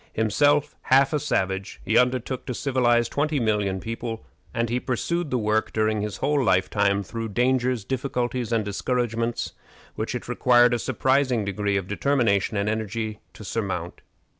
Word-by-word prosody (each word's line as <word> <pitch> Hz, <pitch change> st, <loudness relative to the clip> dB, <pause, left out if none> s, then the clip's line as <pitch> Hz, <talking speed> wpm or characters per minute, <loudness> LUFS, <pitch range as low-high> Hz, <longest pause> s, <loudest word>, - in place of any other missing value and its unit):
Himself 145 Hz, +7 st, +2 dB
half 135 Hz, +3 st, +5 dB
a 150 Hz, -, +2 dB
savage, 95 Hz, -8 st, -2 dB
he 110 Hz, -, 0 dB
undertook 125 Hz, +2 st, +1 dB
to 125 Hz, -, -3 dB
civilize 120 Hz, -3 st, +2 dB
twenty 145 Hz, +3 st, 0 dB
millions 105 Hz, -4 st, 0 dB
of -, -, -14 dB
people, 115 Hz, 0 st, -5 dB, 0.3 s
and 115 Hz, 0 st, -1 dB
he 120 Hz, +2 st, 0 dB
pursued 155 Hz, +7 st, -2 dB
the 130 Hz, -, 0 dB
work 110 Hz, -1 st, 0 dB
during 110 Hz, -1 st, +1 dB
his 105 Hz, -1 st, -4 dB
whole 145 Hz, -1 st, +1 dB
lifetime 100 Hz, -1 st, +2 dB
through 115 Hz, +2 st, -5 dB
dangers, 125 Hz, +1 st, +1 dB
difficulties, 125 Hz, -2 st, -2 dB
and 115 Hz, -2 st, +1 dB
discouragements 115 Hz, +2 st, -1 dB, 0.4 s
which -, -, -3 dB
it -, -, -5 dB
required 120 Hz, -1 st, +4 dB
a 120 Hz, -, 0 dB
surprising 130 Hz, -2 st, +1 dB
degree 100 Hz, 0 st, -1 dB
of 95 Hz, -2 st, -3 dB
determination 110 Hz, -3 st, +1 dB
and 100 Hz, +1 st, 0 dB
energy 110 Hz, 0 st, -3 dB
to -, -, -11 dB
surmount. 95 Hz, -5 st, -4 dB
115 Hz, 160 wpm, -25 LUFS, 105-130 Hz, 0.4 s, half